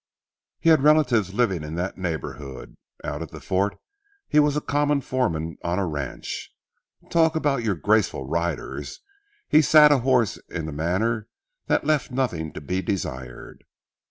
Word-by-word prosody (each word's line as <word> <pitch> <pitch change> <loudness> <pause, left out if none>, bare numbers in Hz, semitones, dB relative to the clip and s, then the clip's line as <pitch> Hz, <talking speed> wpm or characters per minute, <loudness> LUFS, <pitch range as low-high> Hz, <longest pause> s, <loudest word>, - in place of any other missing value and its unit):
He 165 - +3
had 160 -3 +6
relatives 135 - +4
living 100 -8 +1
in 75 +1 -6
that 90 +2 -3
neighborhood. 75 -6 -5 0.3
Out - - -4
at - - -6
the - - -10
fort 95 +2 -1 0.5
he 150 - +3
was 150 0 +3
a - - +3
common 145 0 +1
foreman 85 -12 -2
on 85 +1 -1
a 100 - +1
ranch. 75 -5 -5 0.6
Talk 160 -1 +3
about 145 -5 +1
your 110 -4 0
graceful 105 -7 +1
riders, 80 -3 -3 0.5
he 155 - +6
sat 150 0 +7
a 145 - +5
horse 125 -3 +2
in 80 -3 -4
a - - -4
manner 100 +9 -1 0.4
that - - +1
left 150 -2 +1
nothing 120 - -2
to - - -7
be 90 +6 -2
desired. 70 -10 -5
100 Hz, 155 wpm, -24 LUFS, -, 0.6 s, sat